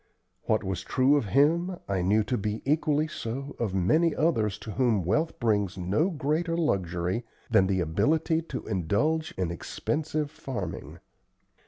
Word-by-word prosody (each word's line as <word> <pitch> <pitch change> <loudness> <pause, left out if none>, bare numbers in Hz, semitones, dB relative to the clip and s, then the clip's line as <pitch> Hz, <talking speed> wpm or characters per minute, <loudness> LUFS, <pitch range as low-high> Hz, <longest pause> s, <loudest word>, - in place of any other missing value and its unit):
What - - +1
was 95 -2 -3
true 130 +8 +3
of 145 - +1
him 165 - +2
I 95 -2 0
knew 105 +4 +3
to 125 +4 -1
be 105 0 -3
equally 150 +1 +2
so 135 -1 -5
of 105 -5 -1
many 155 - +3
others 115 - +1
to 110 - -5
whom 110 -6 +1
wealth 155 - 0
brings 105 -5 +1
no 100 - +1
greater 165 +1 -1
luxury 95 - 0 0.3
than 95 - +5
the 95 -1 +1
ability 150 - +1
to - - -5
indulge 110 - 0
in 90 -3 -1
expensive 150 - -2
farming. 130 - -6
120 Hz, 150 wpm, -27 LUFS, 95-155 Hz, 0.3 s, than